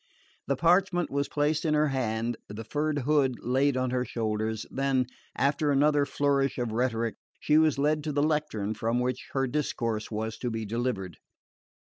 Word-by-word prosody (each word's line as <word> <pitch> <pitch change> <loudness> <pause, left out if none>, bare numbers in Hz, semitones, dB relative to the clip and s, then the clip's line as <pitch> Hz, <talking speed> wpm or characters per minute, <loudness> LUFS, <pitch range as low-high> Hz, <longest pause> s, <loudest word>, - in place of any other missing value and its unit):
The 140 - +1
parchment 175 +3 +2
was 140 0 -1
placed 150 +1 +1
in 155 -2 +2
her 150 0 +3
hand, 120 -3 -1
the 105 +2 -6
furred 150 +6 -1
hood 140 -4 +3
laid 130 +2 +2
on 130 -1 0
her 125 0 +1
shoulders; 110 -2 -2
then, 135 -1 +1 0.3
after 140 +2 +1
another 145 0 +3
flourish 140 -1 +1
of 120 -3 -2
rhetoric, 115 -1 -1 0.2
she 150 +1 +4
was 155 -3 +3
led 150 +2 +1
to 155 - -1
the 145 0 +1
lectern 150 -10 0
from 115 +3 -1
which 125 0 -2
her 135 -1 +1
discourse 115 -5 -2
was 110 0 -4
to 125 - -2
be 110 -1 -3
delivered. 110 -6 -2
130 Hz, 170 wpm, -28 LUFS, 115-150 Hz, 0.3 s, she